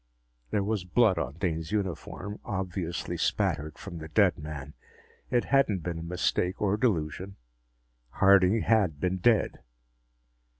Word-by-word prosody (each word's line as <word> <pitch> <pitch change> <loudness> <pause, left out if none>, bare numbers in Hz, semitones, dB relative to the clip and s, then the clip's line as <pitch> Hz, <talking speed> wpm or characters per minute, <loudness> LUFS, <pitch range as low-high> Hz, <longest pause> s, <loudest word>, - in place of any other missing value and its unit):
There 100 - 0
was 105 -2 -1
blood 95 0 +3
on 65 -4 -3
Dane's 80 -3 -2
uniform, 100 +1 -3
obviously 90 -3 -3
spattered 75 +1 -1
from 85 -4 -8
the 80 - -7
dead 90 +3 +3
man. 75 -1 -7 0.6
It 120 - +2
hadn't 110 - +2
been 85 -1 -3
a - - -6
mistake 90 +1 -1
or 100 -1 +2
delusion; 95 - -1 0.7
Harding 95 - +4
had 100 -10 +2
been 90 +3 0
dead. 110 +4 +2
90 Hz, 130 wpm, -28 LUFS, 80-105 Hz, 0.7 s, Harding